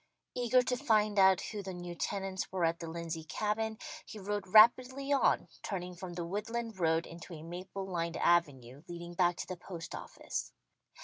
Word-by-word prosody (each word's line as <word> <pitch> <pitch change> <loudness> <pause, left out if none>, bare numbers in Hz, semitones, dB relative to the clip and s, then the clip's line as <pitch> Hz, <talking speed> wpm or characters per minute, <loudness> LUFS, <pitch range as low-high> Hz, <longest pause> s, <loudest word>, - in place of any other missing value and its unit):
Eager 250 +1 +3
to 250 0 0
find 215 -3 +3
out 190 -1 +6
who 210 -2 -5
the 190 -1 -6
new 175 0 -6
tenants 190 +2 -3
were 185 -2 +1
at 165 +1 0
the 165 - -5
Lindsey 165 -1 -4
Cabin, 215 +5 -1 0.3
he - - -10
rode 205 0 -3
rapidly 255 +7 +6
on, 275 - +3
turning 180 -2 -4
from 175 0 -7
the 170 -1 -3
woodland 220 +3 -3
road 165 -1 +2
into 170 +1 -9
a 155 - -9
maple 185 +3 -6
lined 170 -3 -2
avenue 145 -7 +1
leading 175 0 -7
back 175 0 +3
to - - -5
the 185 - -5
post 170 -1 -8
office. - - -5
185 Hz, 180 wpm, -33 LUFS, 170-210 Hz, 0.3 s, out